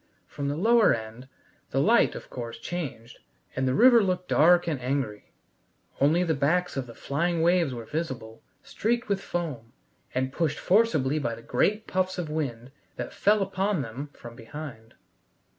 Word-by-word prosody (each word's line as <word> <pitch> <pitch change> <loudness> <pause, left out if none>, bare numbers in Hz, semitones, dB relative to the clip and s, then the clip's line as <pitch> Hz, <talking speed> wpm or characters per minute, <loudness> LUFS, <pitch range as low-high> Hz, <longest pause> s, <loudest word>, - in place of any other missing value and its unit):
From 140 - -5
the 145 +1 -2
lower 225 - +5
end 115 +3 -9 0.4
the - - 0
light, - - +4
of - - -9
course, 120 -2 -6
changed, 135 -10 -6 0.4
and 130 0 0
the 130 - +1
river 240 -1 +7
looked 180 -2 -1
dark 175 +3 +5
and 150 -6 -2
angry. 125 -5 -3 0.7
Only 155 +6 +4
the 165 -2 +1
backs 175 +6 +1
of 135 -2 -3
the 115 - -11
flying 165 +3 -1
waves 170 -4 +3
were 120 -2 -6
visible, 125 -7 -5 0.2
streaked 235 +1 -1
with 200 -1 0
foam, 140 -12 -4 0.4
and 130 +1 -1
pushed 155 -3 0
forcibly 155 - +2
by 120 -5 -2
the 115 - -13
great 215 +2 +1
puffs 185 0 -1
of 165 -4 -4
wind 130 -5 -3 0.2
that - - -6
fell 210 0 +3
upon 190 -4 -1
them 130 +5 -7
from 120 0 -11
behind. 115 -2 -9
150 Hz, 165 wpm, -27 LUFS, 125-180 Hz, 0.7 s, river